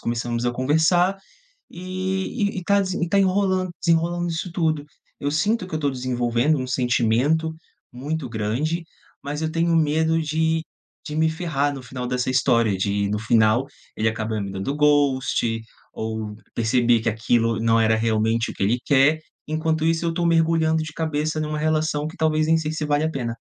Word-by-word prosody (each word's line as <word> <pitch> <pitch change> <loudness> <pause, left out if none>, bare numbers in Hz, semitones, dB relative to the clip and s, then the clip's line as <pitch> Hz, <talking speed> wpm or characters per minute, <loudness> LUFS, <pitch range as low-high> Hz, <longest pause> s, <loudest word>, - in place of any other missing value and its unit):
começamos 120 0 -2
a 120 - +2
conversar, 160 +9 +2 0.6
e 190 +4 -2
e - - -2
e - - -10
tá 200 +3 +3
desen 185 -2 -2
tá 200 - +2
enrolando 190 -1 +1
desenrolando 170 +1 +1
isso 165 +2 -4
tudo. 160 -4 0 0.3
Eu 145 0 -1
sinto 200 +6 +1
que 165 - -12
eu - - +1
estou 145 -2 0
desenvolvendo 125 +2 0
um 130 - -4
sentimento 130 +6 +1 0.4
muito 140 +2 -4
grande, 120 +10 -2 0.4
mas 145 +2 -4
eu 160 0 -1
tenho 165 +1 +1
medo 160 +1 +2
de 160 +1 0 0.4
de 150 - -5
me 160 0 +3
ferrar 155 -4 -1
no 135 - -8
final 125 0 -5
dessa 125 0 -1
história, 115 -5 +2
de 100 +1 0
no 105 +1 -1
final, 110 +2 +3 0.3
ele 110 - 0
acaba 110 -1 -2
me 100 -1 -4
dando 95 +8 -3
ghost, 135 -6 +2 0.3
ou 110 -1 -4 0.2
perceber 120 0 +2
que 115 - +1
aquilo 115 0 +1
não 115 0 +3
era 110 0 +3
realmente 110 +1 +1
o - - -11
que - - -3
ele 115 +5 +2
quer, 145 +2 +4 0.3
enquanto 155 0 -1
isso 165 +1 +1
eu 165 - 0
tô 170 +1 -1
mergulhando 165 -1 +2
de 155 -1 -6
cabeça 155 -1 -2
numa 150 0 -3
relação 155 -1 0
que 160 - -9
talvez 155 -1 +1
nem 165 0 +4
sei 155 -1 -2
se 155 -1 -3
vale 145 0 +1
a 160 - 0
pena. 120 -5 -3
150 Hz, 180 wpm, -23 LUFS, 120-160 Hz, 0.6 s, quer